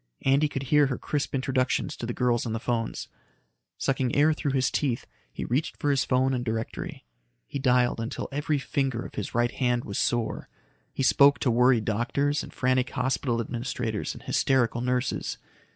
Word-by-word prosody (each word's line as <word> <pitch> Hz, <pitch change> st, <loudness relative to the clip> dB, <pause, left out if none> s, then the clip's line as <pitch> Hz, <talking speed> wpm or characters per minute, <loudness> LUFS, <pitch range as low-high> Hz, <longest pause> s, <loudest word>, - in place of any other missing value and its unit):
Andy 140 Hz, +3 st, +4 dB
could 135 Hz, -2 st, -4 dB
hear 145 Hz, +2 st, +4 dB
her 130 Hz, -, -2 dB
crisp 145 Hz, -2 st, -2 dB
instructions 130 Hz, -1 st, 0 dB
to 115 Hz, -, -5 dB
the -, -, -2 dB
girls 120 Hz, -2 st, +1 dB
on 110 Hz, -, -2 dB
the 115 Hz, -, -2 dB
phones. 115 Hz, -1 st, -2 dB, 0.7 s
Sucking 130 Hz, -2 st, 0 dB
air 150 Hz, +2 st, +5 dB
through 145 Hz, -2 st, -2 dB
his 130 Hz, -1 st, +2 dB
teeth, 130 Hz, -5 st, -1 dB, 0.3 s
he -, -, -5 dB
reached 140 Hz, +7 st, -1 dB
for 145 Hz, -, +1 dB
his 140 Hz, -, +2 dB
phone 130 Hz, +1 st, +2 dB
and 125 Hz, -1 st, -1 dB
directory. 110 Hz, -, -4 dB, 0.4 s
He 140 Hz, -, -5 dB
dialed 125 Hz, -3 st, +2 dB
until 115 Hz, +4 st, -4 dB
every 145 Hz, +1 st, 0 dB
finger 135 Hz, -3 st, -1 dB
of -, -, -9 dB
his 105 Hz, -, -5 dB
right 120 Hz, 0 st, +2 dB
hand 125 Hz, -2 st, 0 dB
was 100 Hz, -, -3 dB
sore. 120 Hz, -2 st, -1 dB, 0.4 s
He 135 Hz, -, -2 dB
spoke 140 Hz, +2 st, +6 dB
to 125 Hz, -, +2 dB
worried 120 Hz, -1 st, +4 dB
doctors 140 Hz, +7 st, 0 dB
and -, -, -9 dB
frantic 130 Hz, 0 st, +1 dB
hospital 125 Hz, -1 st, -1 dB
administrators 115 Hz, -2 st, -3 dB
and -, -, -11 dB
hysterical 120 Hz, -3 st, +1 dB
nurses. 125 Hz, 0 st, -1 dB
125 Hz, 180 wpm, -27 LUFS, 120-135 Hz, 0.7 s, spoke